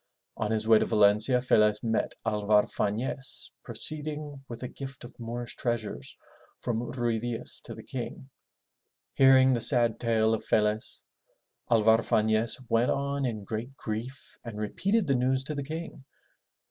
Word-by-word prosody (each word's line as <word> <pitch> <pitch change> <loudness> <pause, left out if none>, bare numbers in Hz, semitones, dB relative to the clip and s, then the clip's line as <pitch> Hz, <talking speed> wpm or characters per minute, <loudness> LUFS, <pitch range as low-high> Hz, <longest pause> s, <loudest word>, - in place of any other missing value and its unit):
On 105 - -3
his 110 0 -2
way 110 -1 +6
to - - 0
Valencia, 105 +4 +4
Felez 105 -4 +2
met 115 -1 -1
Alvar 105 -1 +2
Fafiez 125 +6 -2
proceeding 150 -2 -2
with 120 +1 -8
a - - -3
gift 135 +1 -9
of 120 - -11
Moorish 120 +1 -5
treasures 120 -3 -4 0.4
from 115 -2 -2
Ruy 120 -3 -1
Diaz 120 0 -5
to - - -8
the - - -11
King. 130 +1 -7 0.8
Hearing 130 -1 +5
the 120 - 0
sad 120 -4 +7
tale 110 -2 +1
of 110 - -3
Felez, 105 0 -1 0.7
Alvar 110 -1 +4
Fanez 110 +1 +1
went 115 +2 +1
on 140 0 -1
in 110 -4 -5
great 115 +6 -6
grief 120 +5 -7
and 115 -3 -8
repeated 195 - -1
the 140 - +1
news 130 +1 0
to 150 - -5
the 140 -1 -4
King. 155 -1 -7
120 Hz, 150 wpm, -27 LUFS, 110-135 Hz, 0.8 s, sad